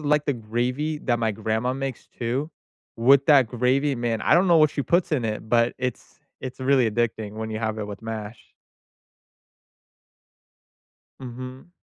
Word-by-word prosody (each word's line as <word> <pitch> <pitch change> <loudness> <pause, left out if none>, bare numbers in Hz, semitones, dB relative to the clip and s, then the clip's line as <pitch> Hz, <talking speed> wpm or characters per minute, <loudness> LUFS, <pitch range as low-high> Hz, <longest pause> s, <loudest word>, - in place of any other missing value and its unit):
like 150 0 +1
the 145 - +1
gravy 125 +6 -2
that 120 -1 0
my 115 -2 0
grandma 110 +4 -1
makes 135 -1 -5
too. 130 +6 -3 0.5
With 135 +4 +5
that 140 -5 +6
gravy, 130 +4 +1
man 120 -2 -2
I - - +4
don't 180 +3 +4
know 170 -2 +5
what 155 -1 +5
she 140 - -2
puts 170 +2 +1
in 125 -6 +1
it, 110 0 -4
but 115 0 +3
it's 125 0 -5 0.2
it's 130 0 -7
really 130 -3 +3
addicting 110 -2 -2
when 110 0 -5
you 110 - -3
have 110 -1 -2
it 105 - -4
with 100 -1 -8
mash. 110 -1 -7 2.7
Mhm. 130 +4 -9
125 Hz, 160 wpm, -24 LUFS, 110-140 Hz, 2.7 s, that